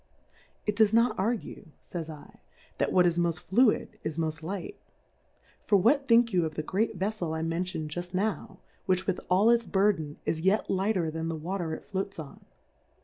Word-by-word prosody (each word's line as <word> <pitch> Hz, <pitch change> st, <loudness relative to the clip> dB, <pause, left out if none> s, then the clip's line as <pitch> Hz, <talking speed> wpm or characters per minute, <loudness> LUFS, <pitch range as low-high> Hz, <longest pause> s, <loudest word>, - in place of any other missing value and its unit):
It 210 Hz, -, 0 dB
does 220 Hz, 0 st, +4 dB
not 230 Hz, 0 st, +4 dB
argue, 220 Hz, -1 st, -2 dB, 0.3 s
Jays 165 Hz, -3 st, -4 dB, 0.4 s
/, -, -, -31 dB
that -, -, +1 dB
what 180 Hz, -1 st, +5 dB
is 175 Hz, 0 st, +2 dB
mofl: 170 Hz, 0 st, 0 dB
fluid, 215 Hz, +7 st, +2 dB
is 160 Hz, -, -4 dB
mofl: 155 Hz, -1 st, -2 dB
light: 200 Hz, -, -6 dB, 0.9 s
For 205 Hz, -, +4 dB
what 270 Hz, +8 st, +3 dB
think 230 Hz, -1 st, +5 dB
you 175 Hz, -2 st, +3 dB
of 155 Hz, -1 st, -3 dB
the 155 Hz, -, -2 dB
great 200 Hz, +8 st, -1 dB
Veflel 190 Hz, -5 st, -2 dB
I 160 Hz, -, -2 dB
mentioned 165 Hz, -1 st, -2 dB
jufl: 175 Hz, +3 st, -5 dB
now, 205 Hz, +2 st, -2 dB, 0.3 s
which 185 Hz, 0 st, +1 dB
with 190 Hz, -1 st, -1 dB
all 195 Hz, +5 st, +5 dB
its 235 Hz, -1 st, +2 dB
Burthen 190 Hz, -7 st, +1 dB
is 160 Hz, -, -1 dB
yet 190 Hz, +5 st, +2 dB
lighter 190 Hz, -4 st, +1 dB
than 160 Hz, +1 st, -3 dB
the 165 Hz, -, -2 dB
Water 165 Hz, 0 st, -3 dB
it -, -, -11 dB
floats 195 Hz, 0 st, -4 dB
on 155 Hz, -4 st, -9 dB
185 Hz, 185 wpm, -28 LUFS, 165-210 Hz, 0.9 s, what